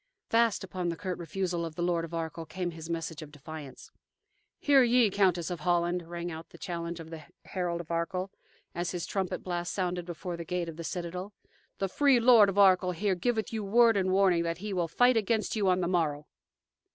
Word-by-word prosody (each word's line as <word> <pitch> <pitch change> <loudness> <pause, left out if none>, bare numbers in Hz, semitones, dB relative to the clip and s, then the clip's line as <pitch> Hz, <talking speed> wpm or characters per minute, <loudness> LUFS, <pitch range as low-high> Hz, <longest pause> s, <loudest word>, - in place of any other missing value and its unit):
Fast 230 -4 +3
upon 180 -2 -3
the 170 - -2
curt 185 +1 -4
refusal 175 +1 -2
of 165 -2 -5
the 175 - -2
Lord 175 -1 +1
of 165 - -7
Arkell 165 -1 -4
came 180 +1 -3
his 160 0 -9
message 165 -1 -4
of 150 -1 -10
defiance. 150 -1 -10 0.7
"Hear 280 -2 +5
ye, 240 -3 +4
Countess 185 -3 +2
of 175 - -4
Holland," 175 0 0
rang 175 0 -4
out 160 0 -8
the - - -14
challenge 170 -1 -5
of 165 0 -10
the 160 -2 -8 0.2
herald 175 -2 -2
of 170 - -11
Arkell, 180 +3 -2 0.4
as 175 0 -2
his 175 -1 -3
trumpet 190 -2 -3
blast 175 -1 -3
sounded 180 -2 -2
before 175 0 -5
the 170 - -5
gate 175 +1 -2
of 160 - -9
the 170 - -6
citadel, 180 +4 -5 0.4
"the 195 - -1
free 275 +5 +4
Lord 230 -4 +7
of 195 - -4
Arkell 185 -2 +5
here 195 +3 0
giveth 220 +4 -1
you 220 -2 -2
word 230 +3 +5
and 190 -1 +1
warning 190 -3 +4
that 170 0 -2
he 205 +2 -5
will 175 -2 0
fight 245 +8 +4
against 220 +1 0
you 205 -3 +1
on 185 0 +2
the 175 - 0
morrow!" 155 -5 0
180 Hz, 210 wpm, -29 LUFS, 170-195 Hz, 0.7 s, Lord